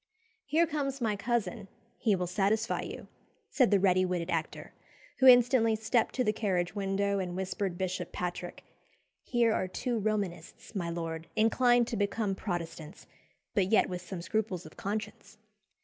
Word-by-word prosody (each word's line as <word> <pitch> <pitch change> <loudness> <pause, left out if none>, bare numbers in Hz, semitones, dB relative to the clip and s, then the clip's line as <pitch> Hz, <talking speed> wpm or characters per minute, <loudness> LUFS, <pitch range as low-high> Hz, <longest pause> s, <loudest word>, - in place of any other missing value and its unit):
"Here 315 +4 +3
comes 285 -4 -2
my 220 -4 0
cousin, 215 -1 -2 0.3
he 215 -5 +3
will 180 -1 -1
satisfy 205 +5 0
you," - - -7 0.4
said 255 -5 +4
the 200 - +4
ready 185 -1 +3
witted 180 -1 -2
actor, 160 -1 -3 0.5
who 265 - +6
instantly 245 -2 +6
stepped 220 +1 0
to 255 - +2
the 215 - +1
carriage 185 -5 -1
window 200 0 0
and 180 -2 -3
whispered 190 -1 -3
Bishop 185 -1 -3
Patrick 180 0 -5 0.6
"Here 235 -3 +2
are 185 - 0
two 235 +5 -2
Romanists, 200 -6 -3
my 175 -5 -2
lord, 165 -1 -4
inclined 240 +2 +4
to 230 - -2
become 205 0 0
Protestants, 170 -4 -5 0.5
but 195 -4 +2
yet 220 - +4
with 180 -1 -4
some 180 -1 -7
scruples 200 -3 -2
of 155 - -12
conscience." 210 +2 -5
200 Hz, 155 wpm, -30 LUFS, 180-225 Hz, 0.6 s, who